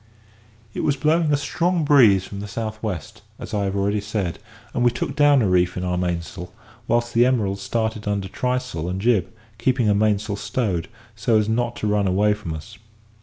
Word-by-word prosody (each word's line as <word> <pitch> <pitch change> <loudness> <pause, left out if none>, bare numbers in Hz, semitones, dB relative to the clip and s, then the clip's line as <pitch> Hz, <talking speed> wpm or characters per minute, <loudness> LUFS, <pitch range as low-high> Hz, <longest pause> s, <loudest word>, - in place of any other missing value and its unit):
It - - -5
was 145 - +1
blowing 155 +2 +2
a 145 - +3
strong 170 +3 0
breeze 115 -10 +5
from 100 - -8
the 105 - -6
south 110 +1 -5
west, 95 -9 -5 0.2
as - - -9
I 100 -1 0
have 95 0 -2
already 100 +1 0
said, 105 -4 -3 0.3
and 120 - 0
we 120 - +6
took 120 - -4
down 145 -3 +5
a - - +2
reef 90 -1 +2
in 90 - -2
our 90 -1 -1
mainsail, 85 -2 -3 0.4
whilst 120 0 +1
the 115 - +5
Emerald 105 -6 0
started 110 +1 -2
under 100 -2 -1
trysail 125 -7 -2
and 95 +1 -3
jib, 110 -2 +1 0.3
keeping 125 0 +1
her 105 - +4
mainsail 105 0 +1
stowed, 100 -8 -2 0.3
so 110 0 +2
as 105 -1 +1
not 120 +2 0
to 110 - -3
run 105 -1 +1
away 105 +3 +3
from 105 -6 -5
us. 105 +8 -10
105 Hz, 200 wpm, -22 LUFS, 95-120 Hz, 0.4 s, we